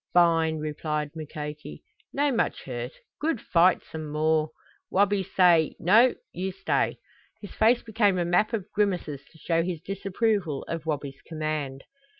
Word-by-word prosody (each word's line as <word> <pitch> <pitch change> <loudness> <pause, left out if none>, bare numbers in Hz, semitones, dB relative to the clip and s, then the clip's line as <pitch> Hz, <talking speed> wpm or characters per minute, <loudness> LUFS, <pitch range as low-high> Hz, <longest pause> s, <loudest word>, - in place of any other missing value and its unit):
"Fine!" 165 -2 +4
replied 150 -1 -3
Mukoki. 150 - -7 0.3
"No 285 0 +1
much 230 -3 -1
hurt. 125 -1 -5 0.3
Good 305 -5 0
fight 180 0 +3
some 155 -2 -7
more. 155 0 +1 0.4
Wabi 200 0 +2
say, 175 -4 +3
'No, 225 +9 +5 0.2
you 190 +2 -3
stay.'" - - 0 0.4
His 205 - -10
face 235 +3 +3
became 210 -4 +2
a 175 - +1
map 180 +6 +2
of 215 -3 -4
grimaces 180 -9 -1
to 160 - -19
show 165 +1 0
his 170 -1 -3
disapproval 195 - -1
of 165 -1 -5
Wabi's 140 -2 -3
command. 155 -4 -3
170 Hz, 145 wpm, -26 LUFS, 155-200 Hz, 0.4 s, No